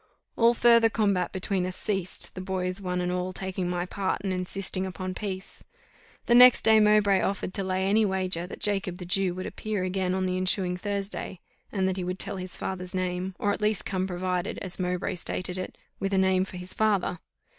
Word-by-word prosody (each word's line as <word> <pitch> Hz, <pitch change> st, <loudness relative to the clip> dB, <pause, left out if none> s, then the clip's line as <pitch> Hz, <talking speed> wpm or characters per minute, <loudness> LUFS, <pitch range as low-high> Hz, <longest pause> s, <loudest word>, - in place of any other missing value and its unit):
All 235 Hz, +1 st, +4 dB
further 235 Hz, -1 st, +6 dB
combat 200 Hz, -5 st, +1 dB
between 190 Hz, 0 st, -1 dB
us 180 Hz, 0 st, -3 dB
ceased, 190 Hz, -4 st, -2 dB
the 185 Hz, -, -6 dB
boys 185 Hz, 0 st, -2 dB
one 180 Hz, -1 st, -2 dB
and 180 Hz, 0 st, -1 dB
all 180 Hz, 0 st, -2 dB
taking 185 Hz, -1 st, -3 dB
my 175 Hz, 0 st, -1 dB
part 190 Hz, +1 st, -2 dB
and 190 Hz, -2 st, -1 dB
insisting 185 Hz, +1 st, -1 dB
upon 185 Hz, 0 st, -4 dB
peace. 190 Hz, -1 st, -6 dB, 0.6 s
The 235 Hz, -, +3 dB
next 250 Hz, 0 st, +8 dB
day 220 Hz, 0 st, +6 dB
Mowbray 210 Hz, -2 st, +4 dB
offered 190 Hz, -1 st, -2 dB
to 195 Hz, -, 0 dB
lay 185 Hz, 0 st, -1 dB
any 215 Hz, +3 st, +4 dB
wager 185 Hz, -3 st, +1 dB
that -, -, -9 dB
Jacob 195 Hz, -3 st, -1 dB
the 180 Hz, -, -7 dB
Jew 180 Hz, 0 st, +1 dB
would 185 Hz, -, -5 dB
appear 215 Hz, -3 st, -3 dB
again 185 Hz, 0 st, -1 dB
on 190 Hz, 0 st, 0 dB
the 185 Hz, 0 st, -1 dB
ensuing 185 Hz, -1 st, +1 dB
Thursday; 200 Hz, -1 st, -4 dB, 0.3 s
and 190 Hz, -2 st, 0 dB
that 190 Hz, 0 st, -1 dB
he 185 Hz, -, -2 dB
would 180 Hz, +1 st, -3 dB
tell 190 Hz, -, -1 dB
his 185 Hz, 0 st, -6 dB
father's 185 Hz, 0 st, -4 dB
name, 185 Hz, 0 st, -2 dB
or 205 Hz, -, 0 dB
at -, -, -5 dB
least 210 Hz, 0 st, +1 dB
come 185 Hz, -1 st, -1 dB
provided, 180 Hz, -1 st, -2 dB
as 185 Hz, -1 st, -5 dB
Mowbray 180 Hz, -1 st, -1 dB
stated 180 Hz, +1 st, -2 dB
it, 185 Hz, -, -6 dB, 0.2 s
with 195 Hz, 0 st, -1 dB
a -, -, +2 dB
name 190 Hz, 0 st, +3 dB
for 185 Hz, -, -9 dB
his 180 Hz, +1 st, -1 dB
father. 205 Hz, -5 st, +1 dB
185 Hz, 210 wpm, -27 LUFS, 180-200 Hz, 0.6 s, next